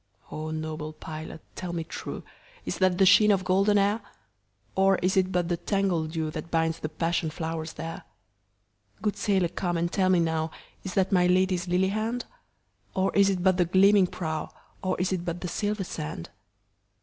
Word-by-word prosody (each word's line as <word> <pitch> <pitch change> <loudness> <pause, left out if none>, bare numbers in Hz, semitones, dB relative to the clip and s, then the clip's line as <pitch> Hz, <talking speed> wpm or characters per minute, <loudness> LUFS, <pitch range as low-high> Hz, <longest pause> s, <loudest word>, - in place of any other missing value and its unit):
O 155 +1 -4
noble 155 0 -4
pilot 155 0 -8
tell 180 -2 -5
me 165 -1 -2
trueIs 485 - -8
that 185 -2 +3
the 190 - +5
sheen 210 +2 +7
of 195 -2 +2
golden 195 +3 +3
hair? 205 +3 +2 0.7
Or 195 0 +4
is 185 +1 +2
it 190 -1 +2
but 175 -2 +1
the 175 0 0
tangled 180 -3 0
dewThat 160 0 -3
binds 165 0 0
the 155 - -4
passion 165 +1 -1
flowers 160 0 -4
there? 165 +1 -6 1.0
Good 210 - 0
sailor 190 -5 +1
come 175 -1 -2
and 170 +1 -1
tell 185 -2 +2
me 185 -1 +4
nowIs 160 +3 -3
that 190 -1 +2
my 180 -2 +4
Lady's 185 0 +2
lily 180 +2 +2
hand? 220 +4 -2 0.7
Or 190 0 +1
is 200 0 +5
it 185 -2 -1
but 185 -1 +4
the 175 - +3
gleaming 190 +2 +5
prow, 160 -3 -4 0.3
Or 185 -1 -1
is 180 +1 0
it 180 -2 -2
but 175 0 -4
the 180 - -3
silver 205 +2 -1
sand? 80 - -6
180 Hz, 175 wpm, -27 LUFS, 165-195 Hz, 1.0 s, sheen